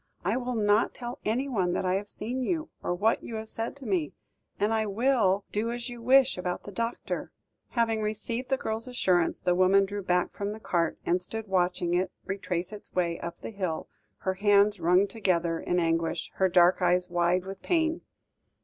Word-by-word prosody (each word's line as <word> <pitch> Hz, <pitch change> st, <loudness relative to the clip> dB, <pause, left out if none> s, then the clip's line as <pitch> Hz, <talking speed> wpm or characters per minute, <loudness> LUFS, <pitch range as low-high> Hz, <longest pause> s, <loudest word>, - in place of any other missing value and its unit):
"I 200 Hz, +5 st, +2 dB
will 250 Hz, -1 st, -2 dB
not 210 Hz, 0 st, +2 dB
tell 240 Hz, 0 st, -6 dB
anyone 220 Hz, -6 st, 0 dB
that -, -, -1 dB
I 185 Hz, -, +2 dB
have 200 Hz, +2 st, -2 dB
seen 245 Hz, +5 st, -4 dB
you, 315 Hz, +4 st, -1 dB
or 175 Hz, -, -1 dB
what 215 Hz, +5 st, +2 dB
you 230 Hz, -, -7 dB
have 220 Hz, 0 st, -5 dB
said 225 Hz, +3 st, -3 dB
to 280 Hz, -2 st, -11 dB
me; 180 Hz, -8 st, 0 dB, 0.5 s
and 210 Hz, +2 st, +2 dB
I 220 Hz, -1 st, +1 dB
will 210 Hz, -3 st, +2 dB
do 220 Hz, +3 st, -1 dB
as 240 Hz, +1 st, -4 dB
you 240 Hz, -1 st, -8 dB
wish 260 Hz, -3 st, +4 dB
about 180 Hz, 0 st, -3 dB
the 205 Hz, -, -8 dB
doctor." 230 Hz, +3 st, -3 dB, 0.4 s
Having 225 Hz, -2 st, +1 dB
received 230 Hz, +4 st, -3 dB
the 265 Hz, -, +2 dB
girl's 220 Hz, 0 st, -3 dB
assurance, 185 Hz, -9 st, +1 dB
the 180 Hz, -, +1 dB
woman 185 Hz, +2 st, +5 dB
drew 205 Hz, +1 st, -4 dB
back 180 Hz, -1 st, +1 dB
from 200 Hz, +1 st, -3 dB
the 220 Hz, -, -9 dB
cart, 170 Hz, -5 st, 0 dB
and 180 Hz, +1 st, +2 dB
stood 220 Hz, +4 st, -5 dB
watching 180 Hz, -2 st, +1 dB
it 185 Hz, +1 st, +1 dB
retrace 180 Hz, -1 st, -3 dB
its 210 Hz, -, -10 dB
way 170 Hz, -2 st, 0 dB
up 170 Hz, 0 st, -6 dB
the -, -, -6 dB
hill, 185 Hz, -6 st, -3 dB, 0.3 s
her 190 Hz, -, 0 dB
hands 205 Hz, +1 st, +4 dB
wrung 180 Hz, +4 st, +4 dB
together 175 Hz, -6 st, 0 dB
in 180 Hz, -, 0 dB
anguish, 165 Hz, 0 st, 0 dB
her 190 Hz, -1 st, +3 dB
dark 175 Hz, +1 st, +5 dB
eyes 180 Hz, 0 st, +3 dB
wide 175 Hz, +1 st, +1 dB
with 195 Hz, 0 st, -7 dB
pain. 325 Hz, -2 st, +1 dB
200 Hz, 195 wpm, -28 LUFS, 180-230 Hz, 0.5 s, woman